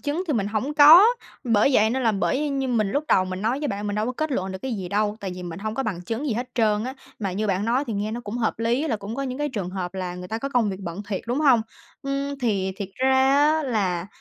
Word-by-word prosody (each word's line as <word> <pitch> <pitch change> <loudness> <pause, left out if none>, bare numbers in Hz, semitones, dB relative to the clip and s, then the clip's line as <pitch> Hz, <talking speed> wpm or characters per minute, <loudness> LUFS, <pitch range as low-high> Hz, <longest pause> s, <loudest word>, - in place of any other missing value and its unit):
chứng 295 +5 -2
thì 310 - 0
mình 210 -7 0
hổng 225 +8 -2
có, 310 +6 +9 0.4
bởi 230 +1 +3
vậy 220 -1 +4
nên 260 +2 -1
là 225 -3 +3
bởi 265 +9 0
như 270 -2 -1
mình 215 -5 +1
lúc 290 +5 -1
đầu 185 - +4
mình 185 +1 -5
nói 235 +5 0
với 295 -1 -2
bạn, 205 +1 -3
mình 205 - -2
đâu 215 +2 0
có 250 - -2
kết 310 +4 -3
luận 190 -5 -2
được 190 - -6
cái 265 -2 -3
gì 185 -3 -5
đâu, 210 +2 0
tại 195 -2 -4
vì 180 - -8
mình 170 -1 -6
hông 215 +2 -4
có 270 - -1
bằng 205 -8 -3
chứng 230 +10 -3
gì 265 - 0
hết 245 +2 -3
trơn 215 -2 +2
á. 260 - -4 0.2
Mà 195 -4 -2
như 210 +4 -1
bạn 195 0 0
nói 245 +5 +1
thì 230 - -3
nghe 205 +1 -2
nó 240 - -4
cũng 230 0 -6
hợp 220 -3 -1
lý 240 +7 0
là 230 - 0
cũng 205 +2 -7
có 275 - -3
những 255 0 -4
cái 295 0 -1
trường 200 -8 -4
hợp 185 -1 -5
là 185 -2 -4
người 180 0 -8
ta 220 - -3
có 275 +4 -3
công 240 -6 +1
việc 190 0 -6
bận 175 +2 -6
thiệt, 195 -3 -2
đúng 245 +5 -1
hông? 265 -6 +5 0.4
Ừm, 275 0 -3
thì 195 -5 0
thiệt 195 -2 -5
ra 265 +1 +3 0.3
á 315 - -1
là, 190 -8 -1
225 Hz, 300 wpm, -24 LUFS, 200-265 Hz, 0.4 s, có